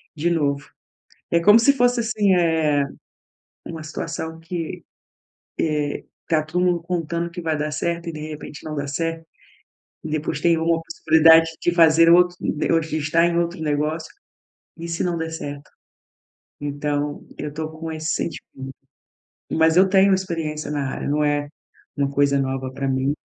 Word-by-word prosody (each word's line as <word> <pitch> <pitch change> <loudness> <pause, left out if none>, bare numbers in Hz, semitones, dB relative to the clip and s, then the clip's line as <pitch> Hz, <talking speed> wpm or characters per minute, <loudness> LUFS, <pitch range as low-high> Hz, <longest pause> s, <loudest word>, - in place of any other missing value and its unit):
de 160 +3 0
novo. 145 -4 -1 0.6
É 170 - +3
como 210 +6 +7
se 280 +5 +5
fosse, 245 -2 +2
assim, 210 -4 +2
eh, 160 -4 +2 0.8
uma 165 -1 -6
situação 160 +1 -5
que, 165 -1 -5 0.8
eh, 150 -2 -1 0.2
tá 160 -2 +2
todo 175 +3 -1
mundo 175 -2 +1
contando 170 -1 -2
que 175 - -6
vai 160 -2 -1
dar 150 0 -2
certo 170 +3 -2
e, - - -3
de 155 - -7
repente, 150 -1 -8
não 155 - -5
dá 145 -1 -3
certo. 165 +3 -3 0.8
Depois 155 -1 -2
tem 170 0 +3
uma 165 0 +1
possibilidade 165 0 +5
de 175 - +2
fazer 165 -1 +6
outro 180 +1 +5
de 150 - -1
ou 165 - +4
de 155 -1 -3
estar 160 +3 +2
em 170 0 0
outro 170 0 -1
negócio 155 +2 -1 0.7
e 170 +1 -6
se 170 0 -2
não 175 -1 -1
der 160 0 -3
certo? 145 -2 -7 0.9
Então 145 0 -3
eu 145 - -5
tô 155 +1 -4
com 160 0 -6
esse 155 +1 -2
sentimento, 150 -4 -5 0.9
mas 160 +1 +3
eu 190 +1 +6
tenho 195 0 +5
experiência 165 -6 -3
na 145 -2 -2
área, - - -4
não 150 +1 +1
é 145 0 0 0.5
uma 140 -1 0
coisa 140 0 +2
nova 130 -1 -3
pra 135 0 -3
mim. 135 +2 0
160 Hz, 165 wpm, -22 LUFS, 150-170 Hz, 0.9 s, como